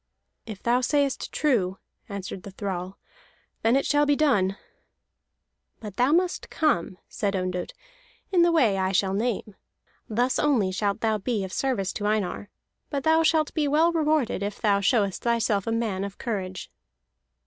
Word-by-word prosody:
"If 215 -3 -8
thou 240 +2 +2
sayest 280 0 0
true," 200 -11 +1 0.3
answered 195 -2 -6
the 200 - -9
thrall, 190 -1 -5 0.6
"then 230 +3 +3
it 275 - +2
shall 290 0 +3
be 290 - +4
done." 205 -11 +2 1.2
"But 210 -3 -9
thou 250 +3 +3
must 355 +2 +1
come," 185 - 0
said 200 -2 -2
Ondott, 185 -1 -2 0.6
"in 360 -3 +4
the 340 0 +5
way 235 -12 +3
I 190 0 0
shall 190 0 +2
name. 215 0 -2 0.6
Thus 245 +4 +1
only 240 -11 +2
shalt 200 +1 -1
thou 220 -1 +1
be 210 0 -1
of 190 - -6
service 230 -9 -1
to 205 - -2
Einar; 210 -1 -1 0.4
but 280 -2 -2
thou 320 +1 +4
shalt 320 -1 +2
be 305 -3 +1
well 315 +4 +3
rewarded 305 - +1
if 200 0 -4
thou 205 -3 +2
showest 200 -2 +1
thyself 230 -4 +1
a - - 0
man 220 -4 -1
of 200 0 -6
courage." 190 -6 -4
220 Hz, 160 wpm, -26 LUFS, 195-280 Hz, 1.2 s, the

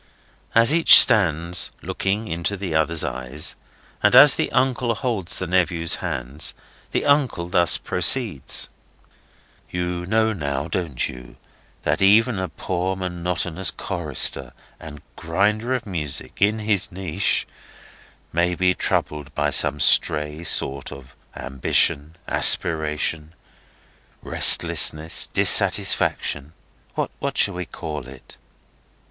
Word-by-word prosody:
As 115 +5 +4
each 165 0 +8
stands 85 -3 +3
looking 100 +3 -4
into 85 +4 -4
the 95 -4 -6
other's 80 0 -1
eyes, 65 +2 -2 0.5
and - - +2
as - - +8
the - - -3
uncle 125 -2 -1
holds 105 -7 -3
the 95 - -4
nephew's 85 -2 -1
hands, 65 +5 -4 0.3
the - - -3
uncle 135 -12 -1
thus 85 -2 +2
proceeds: 90 - +1 1.0
"You 90 0 -5
know 110 +1 0
now, 70 -5 -5
don't 80 -6 -3
you, 60 -1 -13 0.5
that 75 +4 -2
even 105 +2 +2
a 95 - -5
poor 95 +1 -5
monotonous 90 0 -3
chorister 75 -7 -2 0.3
and 75 -2 -13
grinder 105 +9 -2
of 125 - -6
music—in 95 +4 -3
his 105 -3 -2
niche—may 90 -1 -5
be 90 0 0
troubled 75 -5 -3
with - - -1
some 75 - +5
stray 75 +3 +3
sort 70 -4 0
of 65 -2 -14 0.2
ambition, 70 +3 -2
aspiration, 80 0 0 0.9
restlessness, 80 +2 +4
dissatisfaction, 75 +2 +2 0.4
what - - -5
shall - - +3
we 90 -1 -7
call 75 -5 -8
it?" 65 -1 -15
85 Hz, 110 wpm, -20 LUFS, 75-95 Hz, 1.0 s, each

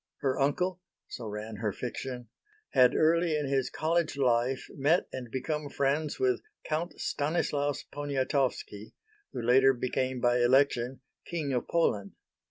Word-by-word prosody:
Her 135 -1 0
uncle 180 +6 0 0.3
so 115 - -6
ran 105 +1 -6
her 105 0 -1
fiction 125 +1 -6 0.4
had 125 -1 +5
early 165 0 +3
in 145 -2 -2
his 135 -1 +1
college 160 -1 0
life 125 0 +1
met 155 +5 +3
and 125 -2 -6
become 150 +4 -3
friends 145 +3 0
with 390 -1 +2 0.2
Count 160 +3 -3
Stanislaus 145 -2 -1
Poniatowski 135 -6 -2 0.4
who - - -5
later 130 +3 +5
became 130 +1 -1
by 120 0 +3
election 130 0 +3 0.3
King 155 -5 -2
of 125 - -1
Poland. 105 -12 +1
135 Hz, 135 wpm, -29 LUFS, 125-150 Hz, 0.4 s, had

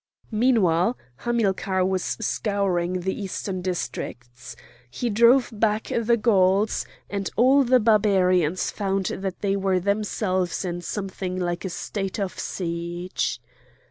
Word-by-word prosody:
Meanwhile 220 -3 +3 0.2
Hamilcar 195 - 0
was 190 -1 0 0.2
scouring 190 -5 0
the 190 +4 -3
eastern 190 -1 -4
districts. 120 -9 -5 0.3
He 240 - -2
drove 235 +5 +5
back 215 0 0
the 235 0 +2
Gauls, 200 -2 +2 0.2
and 200 -2 -3
all 265 +4 +5
the 255 0 +4
Barbarians 190 -6 +3
found 195 -2 -1
that 190 +1 -4
they 200 -1 +1
were 190 -1 +1
themselves 195 -2 -1
in 175 -1 -3
something 185 0 -4
like 175 +1 -2
a - - -2
state 190 +3 -4
of 195 -2 -3
siege. 175 +1 -3
195 Hz, 120 wpm, -24 LUFS, 180-215 Hz, 0.3 s, drove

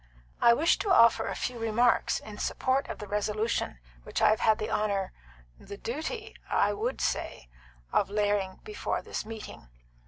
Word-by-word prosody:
"I 235 0 +7
wish 320 +6 +3
to 405 - -1
offer 230 -10 +6
a - - -3
few 245 -2 -3
remarks 230 +2 +2
in 210 -1 -10
support 265 +2 0
of - - -5
the 210 - -7
resolution 210 - -1 0.2
which - - -4
I 215 -1 +5
have 215 - +1
had 220 -1 +4
the 215 - -4
honour 200 -3 0 0.5
the 200 - -9
duty, 375 - -5
I 205 0 +2
would 230 +6 -2
say - - -2 0.4
of - - +2
laying 205 -2 0
before 425 -1 -3
this - - -5
meeting." 220 - -9
220 Hz, 165 wpm, -29 LUFS, 205-245 Hz, 0.5 s, I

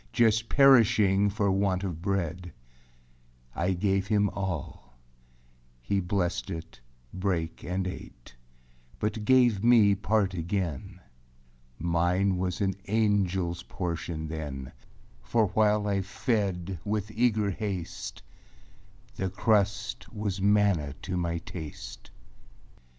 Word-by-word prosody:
Just 115 -1 +3
perishing 110 -7 +5
for 100 -1 0
want 95 -1 +1
of 85 -4 -4
bread. 90 -2 -2 1.0
I 90 +4 +1
gave 95 +1 0
him 105 -1 +2
all; 75 -9 -5 0.8
he 80 +12 -1
blessed 90 -1 -1
it, 80 0 -7 0.3
brake, 90 -4 -2
And 90 +2 -2
ate, 60 -9 -8 0.6
but 105 0 -2
gave 120 -5 +4
me 115 -4 +6
part 100 0 +1
again. 90 +1 -3 0.8
Mine 90 +4 +1
was 90 +1 -2
an 95 -1 +1
angelâs 95 -5 0
portion 85 -3 -4
then, 75 -4 -5 0.5
For 105 - +1
while 105 0 +2
I 100 -1 +1
fed 95 - -2
with 105 0 -2
eager 110 -3 +1
haste, 95 -4 -5 0.9
The 95 - -1
crust 100 +1 0
was 105 -3 -3
manna 100 -8 +2
to 90 - -3
my 85 -1 -1
taste. 80 -7 -8
95 Hz, 105 wpm, -28 LUFS, 85-105 Hz, 1.0 s, me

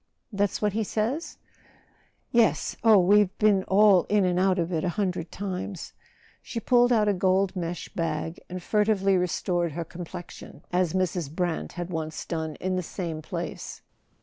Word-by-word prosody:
That's 200 +1 0
what 210 -2 +2
he 220 +1 0
says 230 - -2 0.5
?" - - -38
"Yes. 235 -2 +2
Oh, 220 -2 +7
we've 200 +1 +4
been 205 -3 +3
all 195 -2 +5
in 205 -2 +2
and 180 0 +1
out 190 0 +3
of 175 0 -1
it 160 - 0
a 180 - +1
hundred 180 -5 -2
times.* 190 -2 -5 0.5
She 235 - -5
pulled 245 +1 +4
out 215 -3 +3
a 205 - +3
gold 190 +1 +1
mesh 175 -1 -4
bag 165 -2 -3
and 180 0 -6
furtively 205 -2 +2
re¬ 180 -1 +2
stored 175 -2 -1
her 170 +1 -4
complexion, 175 +1 -9
as 180 -2 +1
Mrs. 180 -4 -1
Brant 175 0 -2
had 175 0 -5
once 160 -2 -4
done 160 -2 -3
in 185 0 -2
the - - 0
same 165 -2 -5
place. - - -6
185 Hz, 175 wpm, -26 LUFS, 175-205 Hz, 0.5 s, Oh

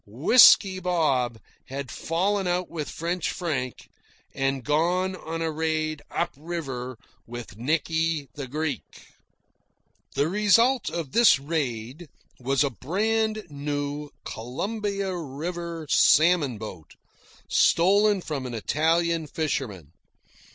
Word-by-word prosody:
Whisky 185 - +6
Bob 150 -10 +1 0.3
had 135 -1 -6
fallen 190 +4 -1
out 180 0 -1
with 155 -3 -4
French 170 +1 -2
Frank 135 -8 -3 0.5
and 135 -1 -1
gone 175 +6 +1
on 165 -2 -5
a 160 - -1
raid 155 -1 -1
"up 170 - -1
river" 135 -6 -5 0.3
with 120 -3 -8
Nicky 160 +4 0
the 140 -3 -6
Greek. 155 +3 -5 1.1
The 145 - +2
result 210 +7 +3
of 165 -6 -4
this 235 - +6
raid 140 0 -4 0.3
was 135 +3 +1
a 140 - 0
brand 215 - -1
new 145 0 -4 0.2
Columbia 195 - -3
River 170 +2 -5
salmon 155 -5 +4
boat, 90 -8 -9 0.5
stolen 200 +3 +4
from 140 -6 -4
an 120 - -5
Italian 165 +6 +1
fisherman. 125 - -3
155 Hz, 110 wpm, -25 LUFS, 135-180 Hz, 1.1 s, Whisky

